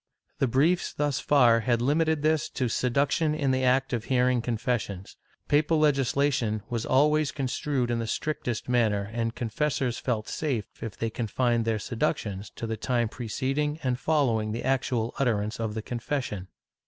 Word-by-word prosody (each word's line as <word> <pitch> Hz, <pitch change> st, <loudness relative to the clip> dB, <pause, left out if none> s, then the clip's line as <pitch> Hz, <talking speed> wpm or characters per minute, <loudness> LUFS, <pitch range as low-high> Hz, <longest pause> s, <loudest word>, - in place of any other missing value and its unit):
The 135 Hz, -, +3 dB
briefs 150 Hz, +9 st, +2 dB
thus 145 Hz, -2 st, 0 dB
far 120 Hz, -5 st, +5 dB
had 120 Hz, 0 st, +1 dB
limited 155 Hz, +4 st, +1 dB
this 155 Hz, -1 st, +2 dB
to 130 Hz, -, -1 dB
seduction 140 Hz, +6 st, +1 dB
in 140 Hz, -3 st, +1 dB
the 130 Hz, 0 st, +1 dB
act 130 Hz, +1 st, +2 dB
of 115 Hz, -2 st, -2 dB
hearing 125 Hz, -1 st, +2 dB
confessions. 115 Hz, -5 st, -3 dB, 0.3 s
Papal 150 Hz, +2 st, +3 dB
legislation 140 Hz, -6 st, +1 dB
was 115 Hz, -2 st, -2 dB
always 150 Hz, +2 st, +3 dB
construed 135 Hz, -2 st, -1 dB
in 120 Hz, -, 0 dB
the 115 Hz, -, -3 dB
strict 155 Hz, +5 st, -3 dB
est 120 Hz, -2 st, -2 dB
manner, 110 Hz, -5 st, +1 dB
and 115 Hz, 0 st, -2 dB
confessors 125 Hz, +1 st, -1 dB
felt 110 Hz, -4 st, -2 dB
safe 130 Hz, -10 st, -3 dB
if 110 Hz, -, -6 dB
they 115 Hz, -1 st, -2 dB
confined 120 Hz, +1 st, 0 dB
their 115 Hz, -1 st, +1 dB
seductions 105 Hz, -3 st, -2 dB
to -, -, -5 dB
the 110 Hz, -1 st, -3 dB
time 120 Hz, 0 st, 0 dB
preceding 135 Hz, +7 st, -2 dB
and 125 Hz, -1 st, 0 dB
following 120 Hz, -10 st, +1 dB
the 115 Hz, -, -4 dB
actual 125 Hz, -3 st, 0 dB
utterance 110 Hz, -4 st, 0 dB
of 110 Hz, -2 st, -2 dB
the 110 Hz, -, -3 dB
confession. 120 Hz, -6 st, -3 dB
125 Hz, 165 wpm, -27 LUFS, 115-140 Hz, 0.3 s, far